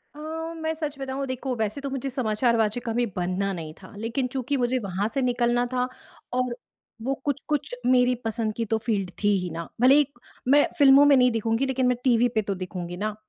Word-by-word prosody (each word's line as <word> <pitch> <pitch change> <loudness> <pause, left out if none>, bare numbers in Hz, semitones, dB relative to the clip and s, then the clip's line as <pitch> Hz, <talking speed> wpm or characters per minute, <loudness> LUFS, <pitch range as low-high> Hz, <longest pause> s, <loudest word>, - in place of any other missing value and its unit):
अ, - - -11 0.4
मैं 320 0 -2
सच 300 -3 -4
बताऊँ 270 0 -3
देखो 260 0 -3
वैसे 220 +4 -2
तो 280 - -3
मुझे 270 0 -3
समाचार 235 -2 +1
वाचिका 225 +2 0
कभी 240 +2 +1
बनना 185 +2 -1
नहीं 160 -3 -6
था, 185 - -12
लेकिन 230 +4 -2
चूँकि 260 +2 -2
मुझे 250 0 +1
वहाँ 200 -1 -2
से 275 - 0
निकलना 245 -1 +1
था 250 0 +1 0.5
और 250 -1 0 0.5
वो 265 +4 0
कुछ-कुछ 290 0 -2
मेरी 250 0 +4
पसंद 225 -1 -1
की 230 - -1
तो 225 +1 0
फील्ड 210 -4 -1
थी - - +3
ही 180 -1 -4
ना, 165 +1 -5
भले 260 +2 +7
ही 295 0 +5 0.4
मैं 290 +3 +6
फिल्मों 280 -1 +7
में 290 -1 +7
नहीं 250 -1 +5
दिखूँगी 225 +3 0
लेकिन 260 -1 +1
मैं 250 -1 +2
टीवी 245 -2 +4
पे 220 - +3
तो 200 -1 -3
दिखूँगी 180 -1 -6
ना। 210 +2 -2
245 Hz, 210 wpm, -25 LUFS, 215-265 Hz, 0.5 s, भले